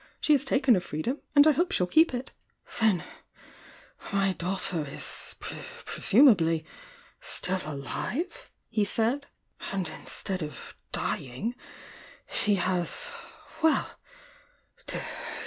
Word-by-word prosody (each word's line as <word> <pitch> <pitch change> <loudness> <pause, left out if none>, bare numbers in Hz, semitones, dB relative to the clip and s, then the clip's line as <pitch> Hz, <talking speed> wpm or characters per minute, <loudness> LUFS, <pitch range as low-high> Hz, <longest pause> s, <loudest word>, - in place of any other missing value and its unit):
She 305 - +4
has 280 -2 +4
taken 270 -2 +4
her 195 - +4
freedom, 175 - -3
and 285 0 +9
I 310 - +8
hope 345 +4 +1
she - - +1
11 180 - -4
keep 320 +1 +6
it! 250 +1 -4 0.5
"Then— 215 -6 +3 1.1
my 195 -1 +2
daughter 180 -2 -2
is— 140 - -7
presumably— 170 - +3 0.5
still 185 +1 -2
alive?" 155 - -4 0.2
he 215 - +1
said. 235 +7 +2 0.4
"And 190 -3 -1
instead 190 -2 -3
of 150 -1 -7 0.2
dying, 130 - -2 0.7
she 205 -1 +2
has 180 - -1 0.3
— - - -19
well! 320 -1 +2
200 Hz, 115 wpm, -28 LUFS, 175-265 Hz, 1.1 s, and